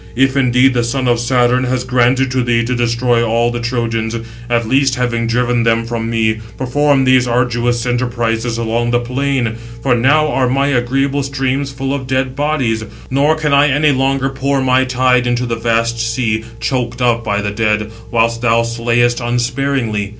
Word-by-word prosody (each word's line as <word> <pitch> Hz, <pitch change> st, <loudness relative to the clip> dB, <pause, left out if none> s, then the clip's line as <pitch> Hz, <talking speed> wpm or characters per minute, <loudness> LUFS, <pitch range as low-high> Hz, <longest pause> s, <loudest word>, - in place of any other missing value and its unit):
If 135 Hz, +2 st, +2 dB
indeed 130 Hz, 0 st, +3 dB
the 120 Hz, -1 st, +1 dB
son 130 Hz, +2 st, -2 dB
of 120 Hz, -1 st, +2 dB
Saturn 125 Hz, +1 st, +2 dB
has 125 Hz, 0 st, -1 dB
granted 125 Hz, +1 st, +1 dB
to 130 Hz, 0 st, 0 dB
thee 120 Hz, -1 st, +1 dB
to 125 Hz, -, -1 dB
destroy 120 Hz, 0 st, +1 dB
all 115 Hz, +1 st, +1 dB
the 120 Hz, -, -3 dB
Trojans, 115 Hz, -2 st, -2 dB, 0.3 s
at 120 Hz, -1 st, 0 dB
least 135 Hz, +1 st, +2 dB
having 120 Hz, -2 st, -1 dB
driven 120 Hz, 0 st, +1 dB
them 115 Hz, 0 st, +1 dB
from 115 Hz, -1 st, -3 dB
me, 110 Hz, -1 st, 0 dB, 0.2 s
perform 140 Hz, +1 st, +1 dB
these 130 Hz, -1 st, +3 dB
arduous 120 Hz, 0 st, 0 dB
enterprises 120 Hz, -2 st, -1 dB
along 115 Hz, +1 st, -1 dB
the 120 Hz, 0 st, +2 dB
plain. 125 Hz, -2 st, -2 dB, 0.3 s
For 130 Hz, -, +2 dB
now 145 Hz, +6 st, +3 dB
are 130 Hz, -3 st, +1 dB
my 135 Hz, +2 st, +1 dB
agreeable 135 Hz, +2 st, 0 dB
streams 135 Hz, 0 st, -2 dB
full 135 Hz, 0 st, -3 dB
of 135 Hz, -2 st, -4 dB
dead 130 Hz, 0 st, -1 dB
bodies, 135 Hz, -7 st, -1 dB, 0.3 s
nor 145 Hz, +4 st, +2 dB
can 155 Hz, -2 st, -1 dB
I 140 Hz, +1 st, +5 dB
any 145 Hz, +2 st, +2 dB
longer 135 Hz, 0 st, 0 dB
pour 135 Hz, +1 st, -1 dB
my 130 Hz, 0 st, +2 dB
tide 125 Hz, -1 st, +2 dB
into 120 Hz, +1 st, 0 dB
the 120 Hz, -1 st, -2 dB
vast 115 Hz, 0 st, 0 dB
sea, 115 Hz, -1 st, -1 dB
choked 125 Hz, -2 st, -2 dB
up 120 Hz, -1 st, +1 dB
by 100 Hz, -2 st, -1 dB
the 105 Hz, -, -2 dB
dead; 105 Hz, 0 st, -1 dB, 0.2 s
whilst 115 Hz, 0 st, +1 dB
thou 115 Hz, -1 st, +2 dB
slayest 120 Hz, +1 st, 0 dB
unsparingly. 120 Hz, -3 st, -1 dB
120 Hz, 180 wpm, -15 LUFS, 115-130 Hz, 0.3 s, I